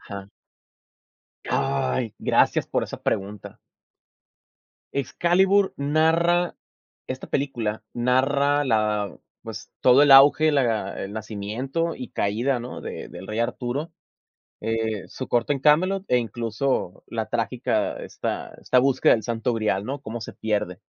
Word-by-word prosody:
Ajá. 100 0 -8 1.2
¡Ay! 70 -2 -1
Gracias - - +2
por - - -1
esa - - -9
pregunta. 100 +1 -3 1.4
Excalibur 185 +8 +2
narra, 165 +4 +2 0.5
esta 130 0 -6
película 120 -6 -2
narra 140 +4 +2
la 105 -5 0 0.3
pues 110 -1 -8
todo 130 +3 +6
el 145 - +5
auge, 145 +3 +8
la 115 -8 0
el 100 - -7
nacimiento 110 +10 -3
y 125 -2 -7
caída, 120 +6 0
¿no?, 120 +1 -7
de - - -7
del 95 - -10
rey 110 - -3
Arturo, 125 +6 -2 0.7
eh, 110 -2 -2
su 130 - -7
corte 120 +4 +1
en 140 - -4
Camelot 185 +7 +3
e 125 - +3
incluso 115 -3 -2
la 110 -1 -3
trágica 115 -2 -1
esta - - -5
esta 125 - +3
búsqueda 135 +1 +4
del 110 - -1
santo 115 +2 -1
grial, 105 -4 0
¿no?, 140 +3 -4
cómo 120 -2 -6
se - - -7
pierde. 105 -5 -2
120 Hz, 130 wpm, -24 LUFS, 110-140 Hz, 1.4 s, auge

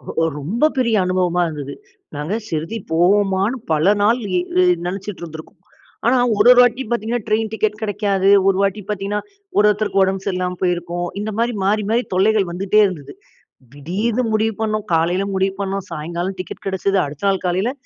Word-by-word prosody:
ரொ 165 - +1 0.2
ரொம்ப 205 - 0
பெரிய 235 -3 +2
அனுபவமா 180 -1 +1
இருந்தது. 145 -3 -6 0.4
நாங்க 150 +6 -3
ஷீரடி 165 +4 -3 0.2
போவோமான்னு 195 +6 +2 0.2
பல 160 +7 +3
நாள் 220 +4 +4 0.7
நினைச்சிட்டு 195 +1 -5
இருந்துருக்கோம். 160 -1 -10 0.5
ஆனா 250 +2 +4 0.2
ஒரு - - +4
ஒரு 250 - +7
வாட்டி 245 +2 +2
பார்த்திங்கன்னா, 235 -1 -2
ட்ரெயின் 215 0 0
டிக்கெட் 215 -1 -1
கிடைக்காது. 200 -2 0 0.2
ஒரு 195 -1 +3
வாட்டி 200 +1 0
பார்த்திங்கன்னா, 205 0 -2 0.4
ஒரு 210 - +5
ஒருத்தருக்கு 205 -1 +1
உடம்பு 190 0 -1
சரியில்லாம 180 -2 -2
போயிருக்கும். 175 0 -1
இந்த 215 +1 -3
மாதிரி 235 +1 0
மாறி 210 +2 +1
மாறி 235 +2 +2
தொல்லைகள் 195 0 +2
வந்துகிட்டே 195 +4 +2
இருந்தது. 160 -7 -8 0.6
திடீர்னு 205 - -2
முடிவு 220 +1 +1
பண்ணோம். 215 -1 -1
காலையில் 175 +5 +1
முடிவு 190 0 +1
பண்ணோம். 195 -1 -3
சாயங்காலம் 170 +4 -4
டிக்கெட் 185 - -8
கிடைச்சது. 195 0 0
அடுத்த 145 +5 -9
நாள் 195 -1 0
காலையல் 185 +7 0
195 Hz, 160 wpm, -19 LUFS, 180-215 Hz, 0.7 s, ஒரு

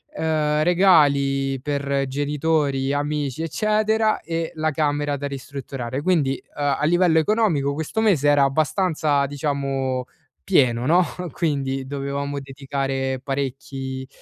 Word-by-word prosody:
uhm, 155 -1 +1
regali 140 -7 +3
per 140 -1 -1
genitori, 145 -1 0
amici, 145 0 -2
eccetera 215 +5 +1
e 165 0 -3
la 155 0 0
camera 145 -1 0
da 140 +1 -4
ristrutturare. 135 -1 -5
Quindi, 155 -6 +2 0.2
uhm, 145 -1 +1
a - - -2
livello 175 0 +4
economico 160 -7 +1
questo 160 +8 -2
mese 170 -10 +3
era 145 -1 +5
abbastanza, 155 0 +1
diciamo, 135 -3 -2 0.4
pieno, 120 - +2
no? 175 +3 +5 0.3
Quindi 135 -5 -1
dovevamo 140 +1 -3
dedicare 135 -1 -3
parecchi 135 -1 -4
145 Hz, 115 wpm, -22 LUFS, 135-160 Hz, 0.4 s, era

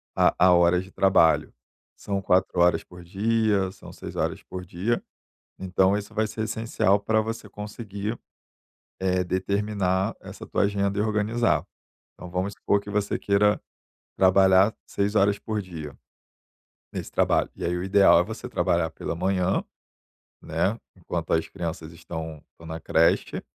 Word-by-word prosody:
a - - +4
a - - +6
hora 85 0 +4
de 95 +1 -13
trabalho. 95 -5 +3 0.4
São 100 -1 -3
4h 90 -2 +2
por 90 0 -13
dia, 100 +1 +1
são - - -13
6h - - -4
por 90 -1 -8
dia, 95 +7 -1 0.6
então 95 +1 +2
isso 105 +1 -6
vai 110 0 +1
ser 110 +1 -5
essencial 110 -2 +1
pra 110 +2 +1
você 110 -1 -5
conseguir, 105 +1 -6 0.8
eh, 90 -1 +1
determinar 95 0 -1
essa - - -10
tua - - -1
agenda 100 0 0
e - - +3
organizar. 110 +2 +1 0.5
Então, 90 - -10
vamos 95 +3 -2
supor 100 - +1
que 100 - -11
você 105 0 0
queira 105 +1 +2 0.6
trabalhar 95 +2 +5
6h 100 0 +1
por 110 0 -3
dia, 80 -7 -8 1.0
nesse - - -5
trabalho - - +2
e - - -5
aí 85 - 0
o 90 - -3
ideal 95 -2 +6
é - - +3
você 110 +4 -7
trabalhar 80 -2 0
pela 80 - -5
manhã, 95 - 0 0.8
né, 105 +4 0 0.2
enquanto - - -4
as 80 0 +1
crianças 85 -2 -6
estão 80 -2 -7
estão 85 - -15
na 80 0 -6
creche... 80 +1 +1
95 Hz, 145 wpm, -25 LUFS, 90-105 Hz, 1.0 s, a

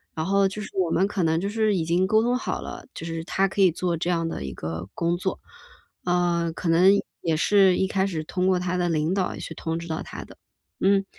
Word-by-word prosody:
然 160 - -2
后， 195 +1 +3
就 210 +2 -5
是 - - -10
我 185 -3 +1
们 190 +4 +2
可 200 -2 -2
能 160 -1 +2
就 195 - -2
是 215 0 +1
已 165 -3 0
经 175 +3 +2
沟 220 +2 +3
通 245 +1 +1
好 250 - -2
了， - - -8
就 - - -6
是 165 0 -4
他 195 +3 +1
可 195 +1 -2
以 185 -2 +6
做 175 +1 -1
这 170 +2 -2
样 165 -2 +1
的 165 - -4
一 65 - -5
个 80 +3 -5
工 170 0 0
作。 185 +2 -3 0.7
呃， 175 -1 +1
可 170 - -2
能 175 +4 +6 0.3
也 160 -2 0
是 190 +1 +4
一 - - +2
开 190 0 0
始 165 -5 -3
通 180 +4 -1
过 185 -1 +3
他 180 0 -1
的 175 -1 +1
领 160 +1 +1
导 190 -2 -1
去 - - -6
通 165 0 -3
知 170 0 -6
到 160 -1 -3
他 - - -7
的。 - - -15 0.4
嗯， 195 0 +3
180 Hz, 270 characters per minute, -25 LUFS, 165-195 Hz, 0.7 s, 以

